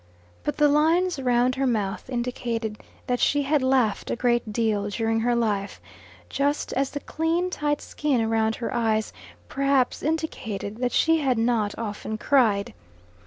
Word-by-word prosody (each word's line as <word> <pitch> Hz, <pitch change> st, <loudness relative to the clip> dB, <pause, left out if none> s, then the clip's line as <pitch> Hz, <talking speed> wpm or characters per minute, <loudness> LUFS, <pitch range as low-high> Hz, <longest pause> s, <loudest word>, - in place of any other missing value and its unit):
But 295 Hz, -, -2 dB
the 295 Hz, -, +5 dB
lines 320 Hz, +3 st, +2 dB
round 250 Hz, -1 st, +2 dB
her 270 Hz, +1 st, 0 dB
mouth 210 Hz, -2 st, -2 dB
indicated 240 Hz, -3 st, -3 dB, 0.3 s
that 245 Hz, -1 st, -1 dB
she 290 Hz, -1 st, +2 dB
had 290 Hz, +1 st, +2 dB
laughed 260 Hz, -6 st, +1 dB
a -, -, 0 dB
great 240 Hz, -2 st, 0 dB
deal 210 Hz, -2 st, 0 dB
during 225 Hz, +2 st, 0 dB
her 240 Hz, +1 st, +1 dB
life, 210 Hz, -4 st, -1 dB, 0.5 s
just 285 Hz, +1 st, -1 dB
as 270 Hz, +1 st, 0 dB
the 285 Hz, -, -5 dB
clean 330 Hz, +5 st, -1 dB
tight 295 Hz, -3 st, -1 dB
skin 260 Hz, -7 st, -1 dB
round 220 Hz, 0 st, +1 dB
her 235 Hz, -, -4 dB
eyes 220 Hz, -2 st, 0 dB, 0.3 s
perhaps 275 Hz, -2 st, +1 dB
indicated 235 Hz, -10 st, -3 dB
that 250 Hz, -1 st, 0 dB
she 325 Hz, 0 st, +3 dB
had 265 Hz, -5 st, +1 dB
not 225 Hz, -3 st, 0 dB
often 215 Hz, -1 st, -4 dB
cried. 215 Hz, -6 st, +2 dB
245 Hz, 155 wpm, -25 LUFS, 220-285 Hz, 0.5 s, the